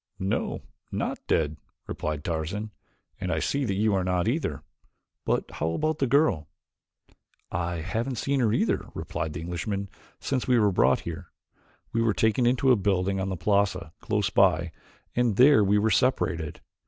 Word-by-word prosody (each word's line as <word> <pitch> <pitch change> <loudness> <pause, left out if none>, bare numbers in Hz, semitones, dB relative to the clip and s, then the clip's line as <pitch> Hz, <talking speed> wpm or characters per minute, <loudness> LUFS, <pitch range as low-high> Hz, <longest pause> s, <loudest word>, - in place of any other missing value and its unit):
"No, 95 +1 -2 0.3
not - - -2
dead," 75 -1 +1 0.3
replied 75 -1 -4
Tarzan, 85 +7 -3 0.5
"and 95 -2 -2
I 80 - 0
see 140 - 0
that 100 - -1
you 105 +1 +2
are 95 -1 +1
not 90 +1 0
either. 115 - -1 0.6
But - - 0
how 80 0 -2
about 155 - -1
the 135 - +2
girl?" 135 - +2 1.0
"I 85 -1 -2
haven't 115 +10 -2
seen 140 +4 0
her," 120 - +3 0.5
replied 80 -1 -4
the - - -5
Englishman, 90 +4 -3 0.3
"since 130 -3 -2
we 125 -1 +4
were 105 -3 +4
brought - - +3
here. 85 +1 -7 0.6
We 115 - +2
were 115 -2 +2
taken 110 +2 +2
into 130 +2 +3
a - - +7
building 95 -1 0
on 95 0 -2
the 95 - -3
plaza 100 -4 0
close 105 -3 -1
by 85 -4 +3 0.4
and 120 -4 +2
there 130 -1 +6
we 100 +1 +3
were 110 +2 +2
separated. 85 - 0
100 Hz, 165 wpm, -27 LUFS, 85-115 Hz, 1.0 s, a